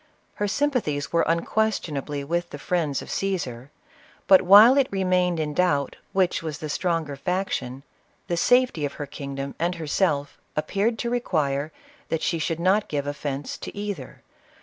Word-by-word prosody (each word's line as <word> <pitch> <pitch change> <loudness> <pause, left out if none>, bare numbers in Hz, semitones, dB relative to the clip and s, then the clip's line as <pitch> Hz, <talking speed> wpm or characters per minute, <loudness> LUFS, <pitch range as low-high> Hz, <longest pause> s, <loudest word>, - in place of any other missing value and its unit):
Her 205 - +2
sympathies 215 - -1
were 170 - +4
unquestionably 165 -6 -1
with 170 +4 -2
the - - -7
friends 155 -2 -1
of - - -9
Caesar; 140 -10 -3 0.6
but 190 -1 +7
while 210 +7 +8
it 275 -2 +3
remained 180 -3 +1
in 150 -1 -2
doubt 145 -6 +1 0.2
which 185 -2 +1
was 155 -3 -4
the 155 - -6
stronger 165 -3 -1
faction, 140 -6 -3 0.4
the 175 - -1
safety 245 -3 +3
of 145 - -2
her 145 - -5
kingdom 140 0 -6
and 175 +2 0
herself 150 -2 -1 0.2
appeared 205 +9 0
to 235 0 -2
re 245 - +1
quire 150 - -1 0.4
that 160 - -1
she 165 - 0
should 165 +1 -2
not 190 +4 +2
give 145 -2 -2
offence 145 -1 -4
to - - -8
either. 200 -10 -6
165 Hz, 160 wpm, -25 LUFS, 145-195 Hz, 0.6 s, while